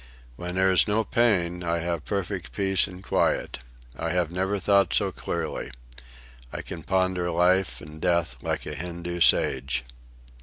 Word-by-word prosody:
"When 90 +6 -5
there 95 0 +3
is 95 - +5
no 110 +2 +2
pain 90 -8 +1
I 85 0 0
have 85 -2 -3
perfect 90 - -3
peace 95 +5 +2
and 95 -1 -11
quiet. - - 0 0.4
I 85 - -3
have 90 -2 0
never 95 +3 0
thought 100 +1 +3
so 100 -2 +2
clearly. 85 -2 -4 0.8
I - - -5
can 85 - -7
ponder 95 0 0
life 90 +2 +2
and 75 +1 -11
death 85 -9 0
like - - -2
a - - -5
Hindoo 85 +2 -5
sage." 65 -4 +3
90 Hz, 155 wpm, -26 LUFS, 85-95 Hz, 0.8 s, is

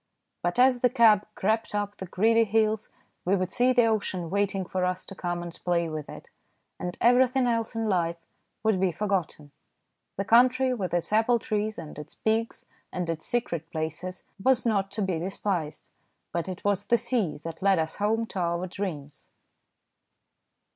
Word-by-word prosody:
But 175 +5 -1
as 250 0 +5
the 250 - +4
cab 215 -3 +5
crept 220 +2 0
up 205 0 -2
the 190 - -7
gritty 225 +6 +3
hills 220 0 +1 0.3
we 190 +3 +2
would 185 -1 -1
see 250 +1 +3
the 245 -2 +4
ocean 190 -6 -1
waiting 195 -1 0
for 185 0 -2
us 180 0 -1
to - - -9
come 175 -2 -3
and 170 -1 -7
play 170 -2 +1
with 155 -2 -6
it, - - -10 0.5
and 180 0 -4
everything 250 +2 +4
else 230 -2 0
in 225 -1 -1
life 170 -4 0 0.5
would 220 -4 +2
be 190 -1 +2
forgotten. 175 -6 -2 0.7
The 195 - -1
country, 255 +3 +4
with 195 -7 -3
its 175 +4 -1
apple 225 +2 +4
trees 215 -1 -2
and 155 -3 -8
its 150 - -9
pigs 225 +1 -1 0.3
and 180 -2 -2
its 160 -1 -5
secret 170 -9 -2
places, 165 +3 -5 0.2
was 260 0 +3
not 200 -4 +1
to 210 -1 -1
be 185 -4 -1
despised, 180 -3 -3 0.4
but 170 +2 -2
it 185 0 -7
was 205 0 +1
the 235 - +4
sea 230 - 0
that 165 -1 -7
led 195 -1 +4
us 160 0 -1
home 220 +2 +1
to 200 - -6
our 170 0 0
dreams. 175 -7 -6
195 Hz, 175 wpm, -27 LUFS, 175-225 Hz, 0.7 s, as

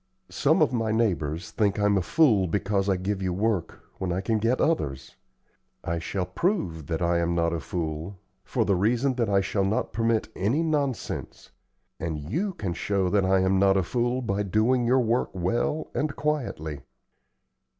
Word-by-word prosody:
Some 155 +2 +3
of 140 - +1
my 115 -2 0
neighbors 90 -7 -1
think 105 -2 +1
I'm 105 0 +3
a 95 - +2
fool 105 - +3
because 100 +2 0
I 95 - +2
give 95 +2 -2
you 95 -1 -1
work 100 -3 -1 0.2
when 95 -2 -2
I 90 - 0
can 110 +3 0
get 115 +4 +1
others. 70 - -1 0.7
I 85 0 -2
shall 90 +3 -2
prove 90 - -1
that 80 +1 -2
I 85 0 +2
am 85 0 0
not 85 0 +1
a 85 - -1
fool, 80 +4 -4 0.3
for - - 0
the 100 - +2
reason 120 +8 +2
that 120 -4 -1
I 100 -1 +3
shall 100 +1 0
not 100 +3 -1
permit 115 -1 +1
any 115 - +1
nonsense, 145 -6 -3 0.5
and 80 -2 -3
you 165 - -2
can 95 - -3
show 95 +2 0
that 100 -2 +3
I 95 0 +3
am 95 0 +2
not 95 0 +4
a 95 - +2
fool 120 +6 -1
by 100 -2 -1
doing 115 +5 +2
your 130 +2 +4
work 120 +1 +1
well 105 - -1
and 150 -1 -1
quietly. 115 - -2
100 Hz, 180 wpm, -26 LUFS, 90-120 Hz, 0.7 s, not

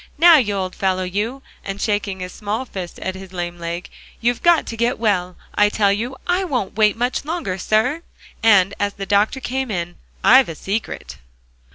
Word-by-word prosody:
"Now, 335 +1 +8
you 210 -7 +1
old 185 -1 -2
fellow, 185 -1 0
you," 210 +9 -3 0.2
and 195 0 -5
shaking 205 -3 -1
his 180 0 -6
small 215 +4 -3
fist 185 -7 -7
at 190 - -2
his 190 0 -10
lame 175 -1 -4
leg, 170 +1 -4 0.3
"you've 240 +1 0
got 345 -2 +4
to 230 - -5
get 235 +2 0
well, 185 -5 0 0.2
I 205 0 +4
tell 205 -1 +2
you. 235 +6 -3
I 360 +2 +1
won't 255 - -2
wait 215 0 +3
much 245 +2 -1
longer, 295 - -3
sir!" 250 - +1 0.4
And 200 -4 +5
as 205 0 0
the 195 - -5
doctor 205 +6 +2
came 265 0 -3
in, 175 -3 -3 0.3
"I've 260 -1 +7
a 165 - -5
secret." 200 +8 -4
205 Hz, 190 wpm, -20 LUFS, 190-245 Hz, 0.4 s, Now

